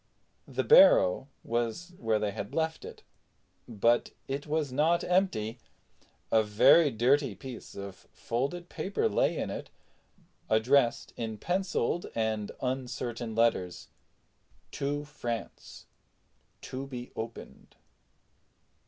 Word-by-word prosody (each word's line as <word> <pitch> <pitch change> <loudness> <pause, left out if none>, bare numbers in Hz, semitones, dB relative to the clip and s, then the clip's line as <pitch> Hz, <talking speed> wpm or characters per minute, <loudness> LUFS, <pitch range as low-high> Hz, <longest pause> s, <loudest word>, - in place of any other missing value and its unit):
The - - -2
barrow 210 - +6 0.2
was 120 +10 -2
where 110 -2 +1
they 105 -1 -1
had 100 +1 -6
left 160 0 -1
it, - - -11 0.6
but 115 +1 +2 0.2
it 140 +2 -4
was 150 -2 -1
not 155 +6 +2
empty. 125 - 0 0.7
A 110 - +5
very 110 +9 +5
dirty 135 +4 +2
piece 130 -3 -9
of 100 -1 -9
folded 140 +9 -3
paper 200 - -1
lay - - +1
in - - -2
it, - - -6 0.8
addressed 120 +3 +2
in 110 -2 -4
penciled 175 - -1
and 110 -2 -1
uncertain 120 -3 -3
characters 110 -6 0 0.8
TO 145 +1 -2
FRANCE 120 -7 -6 0.8
TO 135 +1 -6
BE 125 -2 -7
OPENED. 115 +1 -8
125 Hz, 110 wpm, -29 LUFS, 110-150 Hz, 0.8 s, barrow